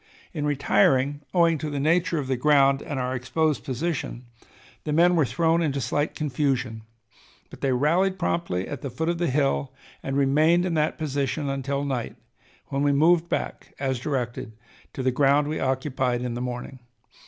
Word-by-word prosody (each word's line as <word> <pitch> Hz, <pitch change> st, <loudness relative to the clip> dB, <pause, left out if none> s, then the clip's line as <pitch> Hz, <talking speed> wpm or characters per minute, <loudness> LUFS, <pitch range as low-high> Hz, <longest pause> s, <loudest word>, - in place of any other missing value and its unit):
In 150 Hz, -1 st, -2 dB
retiring, 140 Hz, 0 st, +2 dB
owing 165 Hz, -2 st, +3 dB
to 155 Hz, -, -3 dB
the 145 Hz, -1 st, -3 dB
nature 165 Hz, +3 st, +2 dB
of 145 Hz, -, -2 dB
the 130 Hz, 0 st, 0 dB
ground 140 Hz, 0 st, +4 dB
and 145 Hz, -4 st, -5 dB
our 125 Hz, 0 st, -2 dB
exposed 140 Hz, +4 st, 0 dB
position, 135 Hz, -3 st, -3 dB, 0.6 s
the 150 Hz, -, -3 dB
men 175 Hz, +3 st, +4 dB
were 155 Hz, -6 st, +3 dB
thrown 165 Hz, +2 st, +1 dB
into 140 Hz, -4 st, 0 dB
slight 145 Hz, +4 st, -1 dB
confusion, 130 Hz, -5 st, -1 dB, 0.7 s
but -, -, -12 dB
they 135 Hz, -, +1 dB
rallied 170 Hz, +9 st, +2 dB
promptly 170 Hz, -, -1 dB
at 145 Hz, -, -6 dB
the 140 Hz, -, -4 dB
foot 160 Hz, +7 st, -2 dB
of 170 Hz, -1 st, -1 dB
the 175 Hz, -, +1 dB
hill, 135 Hz, 0 st, 0 dB, 0.3 s
and 135 Hz, 0 st, -3 dB
remained 155 Hz, +6 st, +3 dB
in 180 Hz, -, -1 dB
that 155 Hz, -1 st, 0 dB
position 140 Hz, -1 st, -2 dB
until 140 Hz, +1 st, -2 dB
night, 130 Hz, -4 st, -3 dB, 0.5 s
when 135 Hz, -, -1 dB
we 145 Hz, 0 st, +3 dB
moved 165 Hz, +4 st, +3 dB
back, -, -, -4 dB
as 130 Hz, -2 st, -1 dB
directed, 120 Hz, -4 st, -3 dB, 0.4 s
to 130 Hz, -, -4 dB
the 130 Hz, -, +2 dB
ground 140 Hz, +2 st, +3 dB
we 155 Hz, -, -2 dB
occupied 130 Hz, -2 st, -1 dB
in 125 Hz, -1 st, -3 dB
the 120 Hz, -, -4 dB
morning. 125 Hz, +1 st, -5 dB
140 Hz, 175 wpm, -25 LUFS, 130-155 Hz, 0.7 s, ground